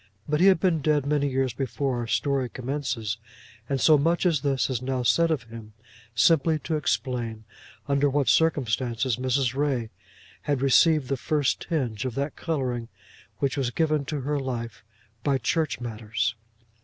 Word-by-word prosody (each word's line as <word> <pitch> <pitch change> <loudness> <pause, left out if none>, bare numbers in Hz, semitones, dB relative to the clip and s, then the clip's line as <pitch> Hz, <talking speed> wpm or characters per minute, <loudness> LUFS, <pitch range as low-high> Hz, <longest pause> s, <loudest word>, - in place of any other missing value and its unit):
But 150 0 0
he 190 - +7
had 190 -3 +5
been 165 -3 +1
dead 150 -1 +2
many 145 -1 +1
years 130 -2 0
before 135 0 -2
our 120 - -3
story 135 +1 0
commences, 125 -5 -3 0.5
and 135 -1 0
so 155 +2 +5
much 170 +5 +1
as 165 -6 +2
this 135 -2 +1
is 125 -3 -2
now 130 -1 -2
said 165 +9 +3
of 155 -6 0
him 115 -2 -11 0.4
simply 160 +6 +4
to 155 +2 -3
explain 120 -6 -2 0.4
under 140 0 +2
what 140 -1 0
circumstances 125 -4 +1
Mrs. 130 0 0
Ray 135 -6 -1 0.5
had 145 -2 -1
received 150 +1 +4
the 135 - -1
first 145 +1 0
tinge 125 -10 -1
of 125 -3 -3
that 140 +1 -2
colouring 130 -8 -2 0.5
which 135 +4 0
was 130 -3 0
given 155 +2 +1
to 145 0 -3
her 145 +2 -1
life 120 -3 -5 0.4
by 140 -2 +2
church 155 +2 -1
matters. 115 -1 -2
135 Hz, 165 wpm, -26 LUFS, 120-150 Hz, 0.5 s, he